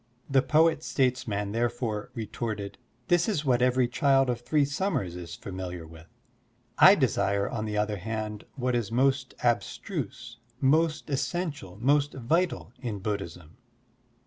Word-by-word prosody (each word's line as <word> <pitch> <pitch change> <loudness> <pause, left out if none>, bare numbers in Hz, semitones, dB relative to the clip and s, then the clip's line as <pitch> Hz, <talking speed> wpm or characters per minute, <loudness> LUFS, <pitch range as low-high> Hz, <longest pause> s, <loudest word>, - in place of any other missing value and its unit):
The 135 -1 +4
poet 155 +2 +3
statesman 120 -8 0
therefore 115 -2 -2
retorted: 110 -2 -4 0.3
"This 175 +1 +3
is 155 -8 -1
what 125 -2 +3
every 125 0 +3
child 135 +1 +3
of 120 -1 -4
three 145 +3 +2
summers 140 - -2
is 85 -1 -7
familiar 90 -3 -6
with. 80 0 -14 0.7
I 190 - +9
desire 100 - +1
on 110 -1 -3
the 105 -1 -3
other 105 0 0
hand 105 +1 -4
what 125 -2 -1
is 115 -4 -1
most 130 +1 +1
abstruse, 120 +1 -2 0.2
most 155 +2 +2
essential, 140 - -3
most 145 +4 +2
vital 165 +8 0
in 120 -5 -4
Buddhism.'' 90 -5 -5
120 Hz, 135 wpm, -28 LUFS, 105-140 Hz, 0.7 s, I